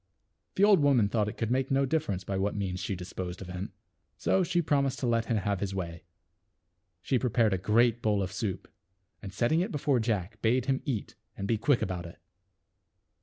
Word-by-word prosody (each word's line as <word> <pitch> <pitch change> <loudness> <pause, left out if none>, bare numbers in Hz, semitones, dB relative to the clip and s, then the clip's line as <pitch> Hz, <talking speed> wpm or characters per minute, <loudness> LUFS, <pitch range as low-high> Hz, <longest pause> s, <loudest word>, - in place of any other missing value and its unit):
The 195 - +2
old 205 -3 +7
woman 135 -8 +4
thought 105 -1 +1
it - - -9
could 115 0 -1
make 130 +1 +1
no 135 0 +2
difference 130 - -1
by 95 - -3
what 100 +2 0
means 95 -3 -2
she 100 - -3
disposed 90 0 -6
of 95 - -7
him. 90 +2 -5 0.5
So 190 - +2
she 175 0 +1
prom 145 -4 +2
ised 135 0 -3
to - - 0
let 115 -1 +1
him 115 -2 0
have 100 -1 -1
his 95 0 -3
way. 85 -3 -5 1.0
She 130 - +1
prepared 115 -4 +2
a 95 - 0
great 115 +4 +3
bowl 105 -2 +1
of 90 - -4
soup, 95 -1 -3 0.5
and 100 - -7
setting 120 - +1
it 195 +5 -2
before 140 -4 +1
Jack 110 -2 -2
bade 120 +2 +2
him 135 0 0
eat 125 -9 -3 0.2
and 100 - -3
be 110 -1 +1
quick 125 +2 +2
about 90 -2 -3
it. 85 - -13
110 Hz, 210 wpm, -29 LUFS, 95-130 Hz, 1.0 s, old